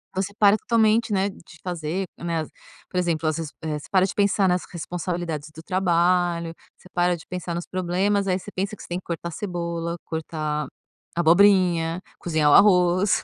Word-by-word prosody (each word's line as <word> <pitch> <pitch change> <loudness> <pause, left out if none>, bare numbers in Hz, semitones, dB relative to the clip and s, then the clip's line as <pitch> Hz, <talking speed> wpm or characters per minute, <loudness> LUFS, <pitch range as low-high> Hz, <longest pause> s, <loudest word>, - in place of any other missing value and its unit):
Você 195 +1 -2
para 205 0 +6
totalmente, 225 0 +2
né, 195 +1 +1
de 165 -4 -15
fazer, 175 +1 -3
né, 165 -2 -2 0.5
por 180 - -5
exemplo, 165 -3 0
as 155 0 0
res 165 -2 -4
eh, 155 -2 -2
você - - -13
para 190 -1 +4
de 195 - -4
pensar 200 -1 +3
nas 180 0 +1
responsabilidades 170 -3 -4
do 160 - -10
trabalho, 175 -2 +1 0.2
você 185 - -18
para 175 0 +2
de 165 - -12
pensar 180 -1 -4
nos 170 +1 -4
problemas, 190 +3 0
aí 185 0 +1
você 205 - -10
pensa 200 +3 -3
que - - -14
você - - -10
tem 175 +1 -3
que - - -20
cortar 170 0 -4
cebola, 170 -3 -3
cortar 155 -2 -3 0.5
abobrinha, 175 -1 +4 0.2
cozinhar 155 -3 +2
o - - +6
arroz. 185 0 +5
175 Hz, 180 wpm, -24 LUFS, 165-190 Hz, 0.5 s, para